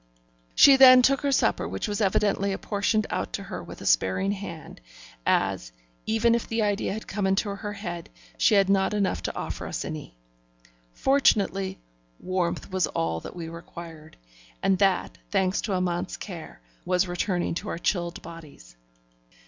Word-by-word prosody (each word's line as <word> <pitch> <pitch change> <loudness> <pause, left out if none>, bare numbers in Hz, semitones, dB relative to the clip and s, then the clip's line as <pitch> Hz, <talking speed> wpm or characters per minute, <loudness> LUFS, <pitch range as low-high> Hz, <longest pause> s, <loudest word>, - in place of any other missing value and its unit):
She 275 -1 +8
then 255 -1 +9
took 275 +2 +3
her 285 -1 0
supper, - - +1
which - - -4
was 205 +1 -2
evidently 200 0 +1
apportioned 205 +2 0
out - - -3
to - - -3
her - - -6
with - - -11
a - - -8
sparing 95 - +2
hand, 170 - -7 0.5
as, - - +1 0.4
even 225 +1 +3
if 235 - -1
the 225 -1 0
idea 205 -1 0
had 220 +2 -5
come 195 -1 -1
into 195 +2 +1
her 205 +1 -6
head, 175 -4 -6 0.3
she 210 - +3
had 195 -1 +4
not 195 +1 +2
enough 200 -2 0
to - - -4
offer - - -5
us - - -4
any. 150 - -7 0.7
Fortunately, 195 - +2 0.4
warmth 185 0 -2
was 185 -2 +1
all 80 0 -2
that - - -10
we 170 -2 -6
required, 165 -1 -10 0.5
and 190 -1 +2
that, 195 -2 +1
thanks 190 -2 +1
to 205 - -2
Amante's 180 0 -1
cares, 175 -6 -8 0.3
was 180 +1 +1
returning 175 0 -1
to 195 +5 -5
our - - -3
chilled 175 -1 -2
bodies. 150 - -12
190 Hz, 165 wpm, -26 LUFS, 170-210 Hz, 0.7 s, then